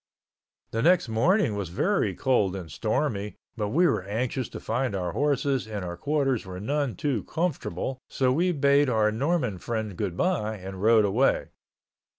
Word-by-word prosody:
The 115 - -1
next 170 -4 +4
morning 135 - +2
was 100 -4 -3
very 195 - 0
cold 105 -8 +1
and 85 -5 -7
stormy, 100 +8 -1 0.2
but 105 -3 -2
we 170 +11 +3
were 170 - +2
anxious 115 +5 -2
to - - -7
find 120 -1 -1
our 90 -2 -2
horses 140 -2 0
and 105 -4 -4
our 85 0 -5
quarters 135 - 0
were 90 -1 -7
none 140 +2 -1
too 130 -2 -1
comfortable, 135 - -2
so 130 -1 +1
we 175 +6 +2
bade 140 -2 +3
our 110 -3 +2
Mormon 125 - 0
friend 110 -1 -3
goodbye 105 - -1
and 95 0 -8
rode 110 0 +5
away. 115 +7 +2
115 Hz, 160 wpm, -26 LUFS, 100-140 Hz, 0.2 s, rode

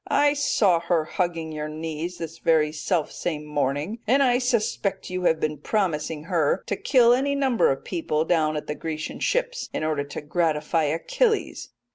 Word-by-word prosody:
I 290 0 +4
saw 215 - +2
her 170 -2 0
hugging 165 -2 -2
your 155 0 -4
knees 160 +3 -5
this 165 0 -7
very 155 -2 +3
self 155 +1 -1
same 150 -3 -4
morning, 150 - -2
and 270 +5 +4
I 245 -2 +3
suspect 230 -7 -1
you 185 0 -2
have 160 -2 +3
been 150 -2 -2
promising 160 -4 -1
her 165 -3 +1
to 200 - -1
kill 240 +1 +4
any 280 +3 +1
number 265 - +2
of 135 - -3
people 160 -3 -1
down 155 -3 +1
at 150 - -5
the 150 - -3
Grecian 155 0 -5
ships, - - -1
in - - -3
order 155 -2 0
to 140 - -7
gratify 160 0 0
Achilles.'" 425 - 0
165 Hz, 175 wpm, -25 LUFS, 155-215 Hz, -, I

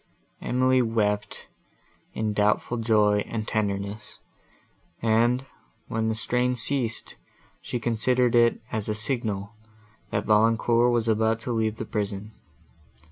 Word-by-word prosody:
Emily 130 +1 +2
wept 105 -3 -1 0.7
in 110 -1 -1
doubtful 105 +3 +1
joy 105 -2 +3
and 110 -2 -4
tenderness; 105 0 -3 0.8
and, 120 +3 +2 0.4
when 110 0 -1
the 110 - -1
strain 125 +3 0
ceased, 125 -1 -2 0.4
she 125 - -4
considered 120 +2 +1
it 120 -1 +4
as 110 -1 -2
a 105 - 0
signal, 105 -3 -2 0.6
that - - -2
Valancourt 115 +2 +3
was 120 -1 +1
about 110 0 +2
to 125 - -4
leave 110 -2 0
the - - -5
prison. 105 -1 -4
110 Hz, 120 wpm, -26 LUFS, 105-120 Hz, 0.8 s, it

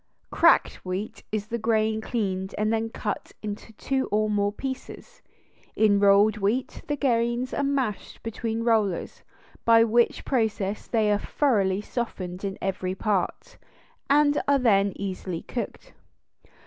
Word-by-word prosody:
Cracked - - +4
wheat 185 +3 -4
is 210 -1 -2
the 235 +2 -4
grain 220 -1 +1
cleaned 195 -5 -2
and 215 +1 +1
then 225 0 0
cut 210 -2 -4
into 210 +1 -6
two 265 +5 -1
or 215 +1 +1
more 205 -1 +1
pieces; 270 - -7 0.5
in 210 -2 +4
rolled 200 +2 +5
wheat 215 +6 -1
the 295 - 0
grains 240 -1 0
are - - 0
mashed 270 -7 -2
between 225 0 -3
rollers, 215 -6 0 0.4
by 230 0 +6
which 230 +1 +2
process 215 -5 -1
they 220 -3 +2
are 205 - +2
thoroughly 205 -10 +1
softened 190 -6 -5
in 195 -1 -3
every 185 -1 -2
part, 210 - -2 0.5
and 290 +1 +4
are 280 0 +5
then 200 -6 +3
easily 185 -3 -4
cooked. 245 - -6
215 Hz, 135 wpm, -26 LUFS, 200-235 Hz, 0.5 s, by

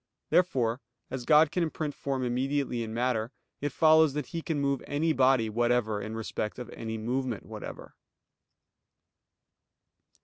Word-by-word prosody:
Therefore, 125 -9 +2 0.3
as 130 -2 -4
God 150 +1 +6
can 180 - 0
imprint 155 -2 -2
form 135 -2 -3
immediately 130 0 -1
in 110 -1 -4
matter, 115 0 0 0.3
it 145 0 -1
follows 160 0 +5
that 150 -2 -2
He 165 +4 -5
can 160 -2 -2
move 140 -1 0
any 155 +3 +1
body 130 -4 +4
whatever 115 -1 +1
in 110 +1 -5
respect 110 -1 -4
of 125 - -7
any 110 -1 -5
movement 120 +1 -2
whatever. - - -8
130 Hz, 140 wpm, -29 LUFS, 115-145 Hz, 0.3 s, God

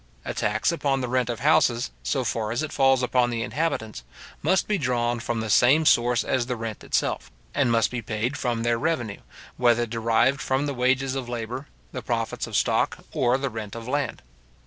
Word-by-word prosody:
A - - -3
tax 105 +7 0
upon 140 -5 0
the 125 - -2
rent 125 -1 0
of 120 -2 -3
houses, 135 -5 +3
so 135 -3 -1
far 110 -2 -2
as 120 +6 -1
it 155 - -4
falls 135 -1 +3
upon 125 -1 +2
the 115 -1 -2
inhabitants, 110 - -2 0.4
must 180 +5 +2
be 210 -2 0
drawn 120 -3 0
from 115 0 -2
the 110 - -4
same 140 +9 +5
source 120 -3 +4
as 125 -2 0
the 125 - -1
rent 115 -2 -6
itself, - - -1 0.2
and 135 -4 +2
must 115 -2 +2
be 125 -1 -3
paid 110 +4 -2
from 120 -5 -1
their 120 0 +1
revenue, 130 -10 -2 0.4
whether 120 -1 +3
derived 115 +4 +1
from 135 +2 0
the 145 - -2
wages 130 +1 +1
of 130 -3 -4
labour, 120 +3 -5 0.2
the - - -5
profits - - -2
of - - -6
stock, - - +1
or 125 +1 +2
the 135 -1 -3
rent 110 -2 -6
of 115 0 -7
land. 140 - -2
125 Hz, 200 wpm, -25 LUFS, 115-135 Hz, 0.4 s, same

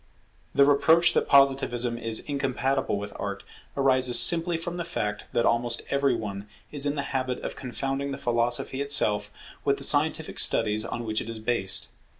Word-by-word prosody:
The 140 - +6
reproach 160 +4 +4
that - - +1
Positivism 135 -4 +3
is 115 -1 0
incompatible 135 -4 -1
with 100 0 -7
Art 100 -1 -5 0.3
arises 130 -2 +3
simply 170 0 +3
from 175 +1 -6
the 175 - -3
fact 105 -11 -4
that 120 - +1
almost 115 0 0
every 140 -2 +2
one 100 -2 -6 0.2
is 145 -1 +1
in 145 - -1
the 140 - -2
habit 130 -1 -1
of - - -5
confounding 135 +2 -3
the 135 - -4
philosophy 120 +2 -1
itself 140 -7 +1 0.3
with - - +1
the - - -9
scientific - - +1
studies 110 +1 +3
on 120 +1 -5
which 110 0 -1
it 115 - -7
is 115 - -6
based. 100 -4 -2
125 Hz, 170 wpm, -26 LUFS, 115-140 Hz, 0.3 s, The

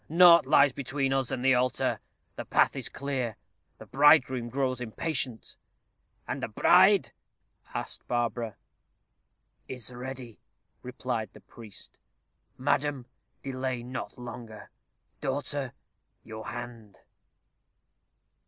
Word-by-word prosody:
Naught 170 +1 +7
lies 140 0 +6
between 135 +1 -1
us 135 -2 0
and 125 0 -3
the 135 - +6
altar. 125 0 +1 0.4
The - - -5
path - - +3
is - - -2
clear. 130 -5 -3 0.4
The 110 - -11
bridegroom 130 -1 +4
grows 130 0 -1
impatient." 125 0 -2 0.7
"And - - -3
the - - -2
bride?" - - +5 0.6
asked - - -4
Barbara. 120 -2 -1 1.1
"Is 125 -1 -5
ready," 125 -3 -7 0.4
replied 125 -4 -4
the - - -14
priest. 110 -4 -12 0.6
"Madam, 140 -1 0 0.4
delay 130 -2 -3
not 125 0 -6
longer. 115 -3 -9 0.5
Daughter, 140 -1 -2 0.5
your 110 0 -8
hand." 120 -5 -8
125 Hz, 105 wpm, -28 LUFS, 120-135 Hz, 1.1 s, Naught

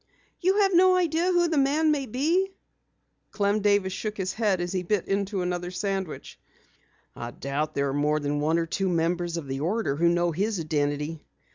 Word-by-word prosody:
"You 380 +3 +2
have 390 -1 +3
no 370 +1 +6
idea 340 -2 +1
who 350 -1 +3
the 320 -3 +1
man 300 +3 +3
may 280 -3 -1
be?" 335 - 0 0.7
Clem 205 0 +1
Davis 200 -2 +2
shook 215 +1 -4
his 190 -1 -2
head 210 -5 +1
as 175 0 -3
he 185 - -1
bit 190 +1 -1
into 195 -1 -1
another 180 0 -2
sandwich. 190 -2 -4 0.8
"I 120 - -6
doubt 140 +5 -3
there 140 0 0
are - - -2
more 150 +2 +1
than 145 0 -1
one 155 +3 +1
or 165 - 0
two 190 +3 -1
members 170 0 0
of 165 - -5
the 135 0 -4
order 175 0 0
who 170 +2 +4
know 175 0 +1
his 200 +4 -1
identity. 150 0 -2
185 Hz, 190 wpm, -26 LUFS, 160-230 Hz, 0.8 s, no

